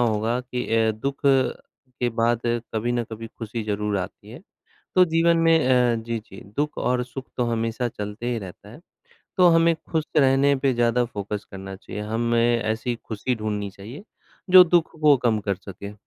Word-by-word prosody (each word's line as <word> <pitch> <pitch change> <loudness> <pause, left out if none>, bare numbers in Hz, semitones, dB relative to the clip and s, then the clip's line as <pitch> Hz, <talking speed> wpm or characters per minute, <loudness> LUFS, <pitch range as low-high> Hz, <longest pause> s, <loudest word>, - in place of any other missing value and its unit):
होगा 115 +1 +1
कि 125 0 -4
अ, 110 -1 +3
दुःख 135 +6 -4
के 130 -2 -1
बाद 115 0 +2 0.3
कभी 120 +3 0
न 120 - 0
कभी 115 +1 -7
खुशी 115 0 -4
ज़रूर 105 -1 -1
आती 100 +3 -7
है। 120 - -10 0.5
तो 185 -1 +7
जीवन 165 0 +2
में 165 0 +4
अ, 125 -2 +3
जी, 115 0 -3
जी, 100 -2 -13 0.2
दुःख 150 +1 -1
और 125 0 0
सुख 130 +1 -8
तो 125 - +1
हमेशा 115 +2 -1
चलते 105 +1 -6
ही 115 - -1
रहता 100 0 -10
है। 120 - -13 0.6
तो 180 -2 +6
हमें 165 0 +4 0.2
खुश 160 -2 0
रहने 140 0 +4
पे 135 0 +1
ज़्यादा 120 +1 +2
फ़ोकस 105 -2 -5
करना 95 0 -8
चाहिए। 105 +2 -7
हमें 115 +2 +1
ऐसी 110 +3 -2
खुशी 115 +3 -2
ढूँढनी 105 -2 -3
चाहिए 115 - -11 0.5
जो 185 0 +10
दुःख 170 -1 +2
को 150 -2 +6
कम 115 -3 +2
कर 100 - +1
सके। 100 +2 -9
120 Hz, 180 wpm, -24 LUFS, 105-135 Hz, 0.6 s, जो